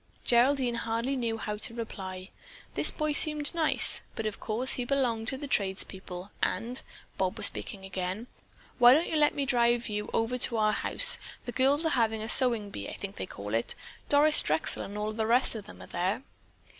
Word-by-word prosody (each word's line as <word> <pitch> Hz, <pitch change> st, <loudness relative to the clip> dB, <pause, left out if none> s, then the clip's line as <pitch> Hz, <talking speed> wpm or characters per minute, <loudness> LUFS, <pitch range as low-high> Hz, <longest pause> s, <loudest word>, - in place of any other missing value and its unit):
Geraldine 250 Hz, +1 st, +3 dB
hardly 235 Hz, +3 st, -2 dB
knew 230 Hz, -3 st, -2 dB
how 210 Hz, -1 st, -4 dB
to 230 Hz, +2 st, -4 dB
reply. 190 Hz, -5 st, -7 dB, 0.4 s
This -, -, +2 dB
boy 305 Hz, -1 st, -1 dB
seemed 300 Hz, 0 st, +4 dB
nice, 325 Hz, -2 st, +4 dB
but 225 Hz, -, -4 dB
of 215 Hz, -, -4 dB
course 235 Hz, +4 st, -1 dB
he 250 Hz, -, -1 dB
belonged 240 Hz, -4 st, -1 dB
to 265 Hz, -, -2 dB
the 290 Hz, -, -6 dB
trades 195 Hz, -7 st, -1 dB
people, 190 Hz, 0 st, -10 dB
and—Bob 225 Hz, -5 st, -3 dB
was -, -, +6 dB
again -, -, -6 dB
speaking: 190 Hz, +2 st, -6 dB, 0.5 s
"Why 245 Hz, +1 st, +8 dB
don't 320 Hz, +3 st, +1 dB
you -, -, -2 dB
let 300 Hz, -1 st, +3 dB
me 280 Hz, -, -1 dB
drive 240 Hz, -2 st, +1 dB
you 210 Hz, 0 st, -4 dB
over 235 Hz, +3 st, -1 dB
to 235 Hz, -1 st, +2 dB
our 215 Hz, -1 st, +2 dB
house? -, -, +1 dB, 0.3 s
The 245 Hz, -, -4 dB
girls 275 Hz, +5 st, +3 dB
are -, -, +2 dB
having 225 Hz, -5 st, 0 dB
a 220 Hz, -, -5 dB
sewing 235 Hz, -6 st, +4 dB
bee, 100 Hz, -, -6 dB
I -, -, -8 dB
think 200 Hz, 0 st, -8 dB
they -, -, -5 dB
call 105 Hz, -, -7 dB
it. 115 Hz, +1 st, -1 dB, 0.3 s
Doris 300 Hz, +1 st, +5 dB
Drexel 155 Hz, +1 st, +1 dB
and 200 Hz, +1 st, -7 dB
all 210 Hz, +1 st, -2 dB
the 220 Hz, 0 st, -2 dB
rest 245 Hz, +3 st, +3 dB
of 210 Hz, -3 st, -8 dB
them -, -, -12 dB
are -, -, -10 dB
there." 185 Hz, +8 st, -2 dB
230 Hz, 200 wpm, -29 LUFS, 205-265 Hz, 0.5 s, Why